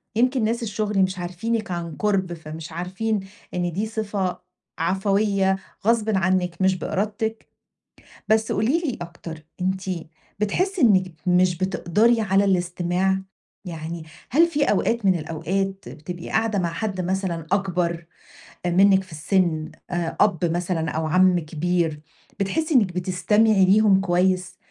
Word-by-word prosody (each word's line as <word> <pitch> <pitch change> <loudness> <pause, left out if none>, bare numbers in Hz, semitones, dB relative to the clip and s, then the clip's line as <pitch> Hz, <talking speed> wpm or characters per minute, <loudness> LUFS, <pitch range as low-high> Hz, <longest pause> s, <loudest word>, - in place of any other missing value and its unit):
يمكِن 250 +1 +2
ناس 230 +2 0
الشغل 210 -2 -1
مش 185 0 -1
عارفينِك 215 +5 -3
عن 170 -2 -4
قرب، 190 -3 0
فمش 160 -1 -8
عارفين 190 +6 -2 0.3
إن 175 -1 -1
دي 200 +6 -1
صفة 205 -4 -2 0.4
عفوية 195 +2 +1 0.3
غصبٍ 225 -1 +3
عنِك 185 -1 0
مش 190 0 +3
بإرادتِك. 215 +4 -3 0.8
بس 220 0 +3
قولي 235 - +2
لي 305 -8 -3
أكتر 170 -2 -8 0.2
أنتِ 190 +1 0 0.6
بتحسي 370 - 0
إنِك 190 -7 +4
مش 180 0 +3
بتقدَري 190 +5 +2
على 195 -1 +3
الاستماع؟ 180 +1 +1 0.4
يعني 165 -1 -6 0.3
هل 325 +6 +5
في 300 -3 0
أوقات 230 -1 +1
من 190 -1 +5
الأوقات 180 +5 -3
بتبقي 175 +3 -8
قاعدة 220 -2 +1
مع 175 -2 0
حد 190 +1 -2
مثلًا 180 -3 -2
أكبر 180 -4 0 0.6
منِك 190 +2 +5
في 185 - -18
السن، 160 0 0 0.2
آآ 175 -2 -2
أب 205 -1 +4
مثلًا 170 -1 -1
أو 160 0 -2
عم 180 +3 +4
كبير 165 0 -1 0.4
بتحسي 310 - 0
إنِك 205 -8 +4
بتستمعي 195 +3 +3
ليهم 195 0 +5
كويس، 180 -1 +1
190 Hz, 130 wpm, -23 LUFS, 175-210 Hz, 0.8 s, هل